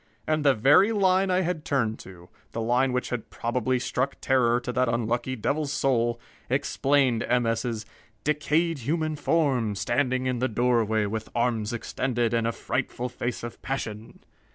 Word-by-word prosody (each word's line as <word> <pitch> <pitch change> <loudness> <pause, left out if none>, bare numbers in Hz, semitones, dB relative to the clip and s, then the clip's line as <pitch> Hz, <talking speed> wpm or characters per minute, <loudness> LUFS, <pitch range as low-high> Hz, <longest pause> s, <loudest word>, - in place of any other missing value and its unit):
And 155 -1 0
the 140 -2 +5
very 145 - +5
line 190 -2 +3
I 185 0 +2
had 175 -3 -2
turned 120 -8 0
to, 90 -1 -13 0.2
the 115 - -2
line 125 +3 +2
which 125 0 -1
had 125 -3 -4
probably 125 +2 -1
struck 125 +2 -1
terror 120 -2 +2
to 125 - -4
that 130 -1 +2
unlucky 120 +2 -1
devil's 145 +5 -1
soul, 120 -3 +1 0.3
explained 135 -4 +2
M. 125 -1 +1
S.'s 115 -1 -1 0.4
"decayed 150 +2 +1
human 155 +5 -1
form, 135 -9 +1
standing 125 +5 0
in 125 -2 -1
the 130 - +1
doorway 115 -2 +2
with 110 +2 -4
arms 115 -2 0
extended 120 0 -1
and 115 -1 +1
a - - +1
frightful 125 +1 -3
face 120 -1 -4
of 120 - -7
passion!" 115 -4 -5
125 Hz, 160 wpm, -26 LUFS, 115-140 Hz, 0.4 s, the